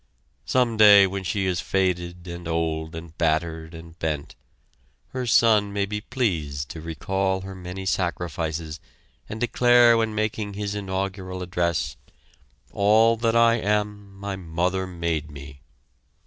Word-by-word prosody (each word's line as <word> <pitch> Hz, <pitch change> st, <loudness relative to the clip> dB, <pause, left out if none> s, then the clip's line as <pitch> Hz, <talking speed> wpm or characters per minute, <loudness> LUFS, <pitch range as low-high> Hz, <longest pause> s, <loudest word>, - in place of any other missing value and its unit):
Some 125 Hz, -3 st, +1 dB
day 105 Hz, -2 st, +8 dB
when 95 Hz, 0 st, -4 dB
she 95 Hz, +1 st, -1 dB
is 90 Hz, -2 st, 0 dB
faded 90 Hz, -2 st, -1 dB
and 85 Hz, -1 st, -7 dB
old 80 Hz, -1 st, -2 dB
and 80 Hz, 0 st, -9 dB
battered 80 Hz, 0 st, -1 dB
and 80 Hz, 0 st, -12 dB
bent, 75 Hz, -3 st, -3 dB, 0.8 s
her 130 Hz, -1 st, -4 dB
son 110 Hz, -3 st, +4 dB
may 100 Hz, 0 st, 0 dB
be 105 Hz, +1 st, -4 dB
pleased 80 Hz, -, -2 dB
to 80 Hz, -, -8 dB
recall 95 Hz, +4 st, -1 dB
her 95 Hz, 0 st, -8 dB
many 90 Hz, +1 st, -7 dB
sacrifices 85 Hz, -4 st, -2 dB, 0.5 s
and 110 Hz, -, -6 dB
declare 120 Hz, 0 st, +5 dB
when 110 Hz, -1 st, 0 dB
making 110 Hz, -1 st, -2 dB
his 100 Hz, 0 st, -3 dB
inaugural 95 Hz, -2 st, -4 dB
address: 85 Hz, -8 st, -1 dB, 0.7 s
"All 110 Hz, +3 st, +4 dB
that 115 Hz, 0 st, +1 dB
I 115 Hz, 0 st, +5 dB
am 105 Hz, -1 st, -2 dB
my 100 Hz, 0 st, -5 dB
mother 90 Hz, +1 st, -2 dB
made 85 Hz, -4 st, -3 dB
me!" 70 Hz, -2 st, -11 dB
95 Hz, 135 wpm, -24 LUFS, 85-105 Hz, 0.8 s, day